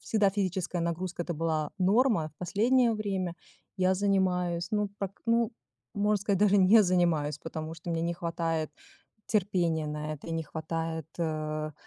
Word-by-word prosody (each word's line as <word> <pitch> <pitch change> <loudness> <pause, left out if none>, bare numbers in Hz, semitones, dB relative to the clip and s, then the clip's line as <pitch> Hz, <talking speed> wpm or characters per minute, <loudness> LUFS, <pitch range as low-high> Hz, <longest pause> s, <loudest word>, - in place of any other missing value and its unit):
всегда 210 -3 +2
физическая 185 -3 -1
нагрузка- 170 +1 -3
это 170 - -3
была 155 -1 -1
норма. 200 -3 +3
В 150 - -36
последнее 230 +6 +3
время 195 -5 -2 0.4
я 185 -1 +3
занимаюсь, 180 -3 +1
ну, 210 -1 +1
прак 195 -1 -5
ну, 230 0 +2 0.4
можно 210 +1 +2
сказать, 200 -2 +1
даже 205 -1 +5
не 200 +4 +7
занимаюсь, 170 -6 +1
потому 160 0 -6
что 165 +1 -7
мне 165 -1 0
не 170 +1 -1
хватает 165 -2 -2 0.6
терпения 175 -6 +1
на 150 0 -3
это 155 +3 -11
и - - -3
не 165 0 -1
хватает, 160 0 -4
э, 155 -2 -2
175 Hz, 155 wpm, -29 LUFS, 160-200 Hz, 0.6 s, не